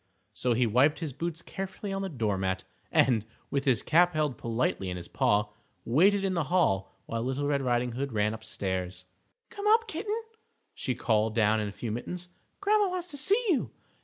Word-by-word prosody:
So 125 +1 +1
he 120 +2 +3
wiped 130 +7 +4
his 160 -6 -4
boots 165 +4 -4
carefully 195 +1 -5
on 195 - -2
the 195 - -2
doormat, 95 - -1 0.3
and, 115 -5 +4 0.3
with 140 0 0
his 130 -5 +3
cap 175 +1 +4
held 150 -4 +1
politely 115 -4 -1
in 90 - -3
his 85 - -7
paw, 105 0 +2 0.4
waited 195 - +4
in 190 - 0
the 170 -4 0
hall 95 - +1
while 115 0 -3
Little 130 +4 -1
Red 140 -1 +1
Riding 125 -1 +1
Hood 135 +3 -3
ran 105 -1 +1
upstairs. 95 -4 -4 0.5
"Come 405 0 -4
up, 450 +2 +5
Kitten," 420 +5 -2 0.5
she 130 - -2
called 110 -2 +1
down 110 -1 +3
in 105 - -1
a - - -5
few 110 +2 -5
minutes; 175 +10 -5 0.3
"Grandma, 410 0 +3
wants 360 -1 -3
to 285 - -6
see 405 - +2
you. 305 -9 +2
135 Hz, 190 wpm, -29 LUFS, -, 0.5 s, up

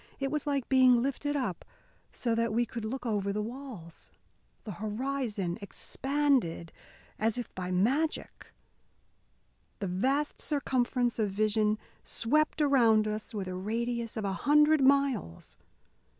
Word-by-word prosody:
It 275 -1 -1
was 300 -1 -2
like 280 -3 0
being 255 -2 +5
lifted 290 +2 -2
up 250 - -2 0.5
so 235 -2 -1
that 230 -1 +1
we 235 +2 +2
could 230 -1 -6
look 250 +4 -4
over 205 -3 0
the 210 - -2
walls. 230 -9 -9 0.5
The 215 - -6
horizon 215 -2 -3
expanded 265 - -1 0.5
as 220 +2 +1
if 245 - -5
by 180 -1 -4
magic. 255 - 0 1.3
The 205 - -4
vast 265 +11 0
circumference 250 -4 0
of 210 -2 +1
vision 215 +1 +1 0.3
swept 305 +6 +1
around 230 -7 +4
us 215 0 -4
with 195 -3 -3
a 185 - -4
radius 230 +4 -3
of 215 - -2
a 195 - -1
hundred 300 +6 +4
miles. 265 - +1
235 Hz, 135 wpm, -30 LUFS, 210-275 Hz, 1.3 s, being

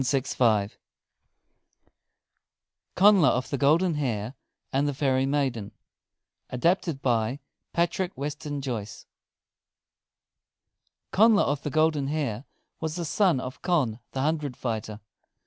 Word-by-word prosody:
CONNLA 195 -3 +6
OF 125 +1 -1
THE 140 - -1
GOLDEN 160 +5 +3
HAIR 120 -6 -2 0.4
AND 140 +2 +2
THE 145 - -2
FAIRY 135 -1 +1
MAIDEN 130 -7 -1 0.8
ADAPTED 165 +1 0
BY 120 +1 0 0.3
PATRICK 175 +2 -1
WESTON 145 +1 -4
JOYCE 110 -7 -5 2.1
Connla 215 +1 +5
of 145 0 -1
the - - -3
Golden 155 -2 +1
Hair 140 -5 -2 0.3
was 160 -1 -3
the 175 -1 -3
son 180 -3 +2
of 130 0 -7
Conn 145 - 0
the 130 - -2
Hundred 150 -3 -1
fighter. 110 -3 -4
140 Hz, 105 wpm, -26 LUFS, 125-160 Hz, 2.1 s, CONNLA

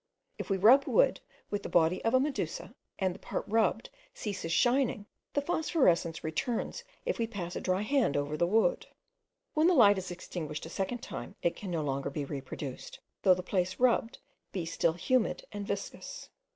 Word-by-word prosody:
If - - -5
we 195 - +2
rub 250 +8 +7
wood - - +3 0.3
with 205 - -1
the - - -6
body 170 +1 +3
of 225 +3 +2
a - - +6
medusa, 280 0 -2 0.2
and 190 -2 0
the - - -12
part - - -4
rubbed 220 0 +1 0.2
ceases 200 - -4
shining, 245 +1 +2 0.3
the 285 - +1
phosphorescence 265 - +1
returns 235 - -2 0.2
if - - -1
we 230 - +1
pass 185 -6 -5
a - - -3
dry 185 +2 0
hand 255 - +2
over 145 +1 -1
the 170 +3 +2
wood. 225 - +2 0.7
When 310 +2 +4
the 360 - +4
light 205 -7 +6
is 190 - -6
extinguished 170 -4 -5
a - - -7
second 215 +7 -3
time, - - -7
it 170 - +1
can 200 - -7
no 165 -3 -1
longer 140 -1 -2
be 145 0 -3
reproduced, 135 -1 -6 0.2
though 185 -2 +6
the 180 - -5
place 185 0 -1
rubbed 245 -1 +2 0.3
be 180 -4 -3
still 165 0 +1
humid 250 +7 0
and 205 -1 -5
viscous. 200 0 -5
195 Hz, 185 wpm, -31 LUFS, 170-240 Hz, 0.7 s, rub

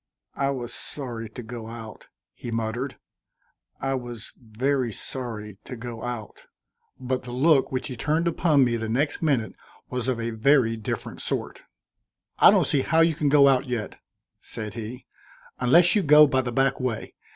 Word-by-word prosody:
"I 140 0 0
was 120 -4 -4
sorry 120 -6 -5
to 120 +3 -9
go 115 0 -8
out," 115 -2 -10 0.3
he - - -8
muttered. 115 +4 -3 0.8
"I 135 0 -1
was 120 -3 -6
very 125 +2 -1
sorry 105 -3 -6
to 130 - -7
go 115 -1 -7
out," 120 -4 -6 0.5
but 130 0 -2
the 125 - -8
look 135 +2 +3
which 130 +2 -2
he 130 - -6
turned 155 +7 0
upon 160 -4 +3
me 120 -1 0
the 110 -1 -4
next 140 +6 0
minute 135 -9 +1 0.4
was 125 -1 -2
of 130 -3 0
a 115 0 -2
very 115 0 +3
different 110 -1 -4
sort. - - -3 0.8
"I - - +9
don't - - +4
see 140 - +2
how 160 +4 +2
you 165 0 +4
can 150 -1 0
go 140 -1 +6
out 135 0 +3
yet," 120 -4 -4 0.4
said 105 -3 -7
he, 115 +2 -7 0.5
"unless 165 +8 +5
you 210 - +4
go 150 -2 +8
by 130 -2 +1
the 125 -1 -4
back 135 +2 +1
way. 125 -4 -3
125 Hz, 175 wpm, -25 LUFS, 115-140 Hz, 0.8 s, I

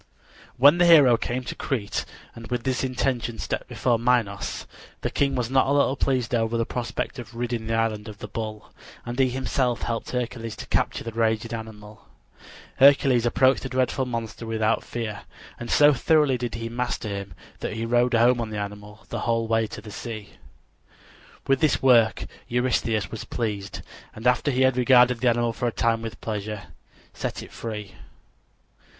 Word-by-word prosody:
When 145 +7 +6
the 175 - +5
hero 145 -8 +8
came 125 +2 -3
to - - -5
Crete 115 -7 -3 0.3
and 115 -1 -10
with 125 -1 -2
this 130 +1 -1
intention 125 -3 -1
stepped - - -3
before 120 -2 0
Minos, 115 -5 0 0.4
the - - -2
king 140 -1 +1
was 125 -1 -2
not 130 0 +3
a - - +1
little 140 -1 +3
pleased 130 -4 0
over 115 0 +1
the 115 - 0
prospect 125 +2 -4
of 115 -1 -9
ridding 120 -2 -3
the 115 - 0
island 110 -1 -1
of 105 -2 -9
the - - -7
bull, 110 -2 -6 0.3
and 120 +2 -5
he 130 -1 +4
himself 125 -1 -1
helped 115 -1 -3
Hercules 120 -2 -3
to - - -8
capture - - -1
the 115 - -5
raging 115 0 0
animal. 110 -2 -9 0.7
Hercules 135 -3 +5
approached 130 +2 +3
the 130 - -5
dreadful 130 0 0
monster 115 -1 -5
without 110 0 0
fear, 110 -4 -5 0.4
and 120 - -6
so 145 0 +6
thoroughly 150 0 +3
did 120 -2 -4
he 115 0 -4
master 120 -2 -3
him 100 -1 -6 0.2
that - - -4
he 115 +1 -3
rode 120 +1 +2
home 120 +1 +4
on 115 - -3
the 110 - -5
animal 105 +1 -7
the - - -3
whole 115 -1 0
way 115 0 +1
to 105 - -8
the 105 0 -10
sea. 110 -2 -7 1.2
With 135 -1 +2
this 155 -3 +2
work 115 -4 +4 0.2
Eurystheus 120 -4 0
was 110 - -5
pleased, 100 -4 -4 0.3
and 110 - -9
after 125 +3 +3
he 130 -1 +1
had 130 -1 +3
regarded 125 -1 +5
the 125 - +3
animal 120 0 +1
for 120 - -2
a - - 0
time 115 0 +1
with 115 -1 -7
pleasure, 105 -3 -5 0.4
set - - -4
it - - -13
free. 105 -3 -6
115 Hz, 180 wpm, -25 LUFS, 110-125 Hz, 1.2 s, hero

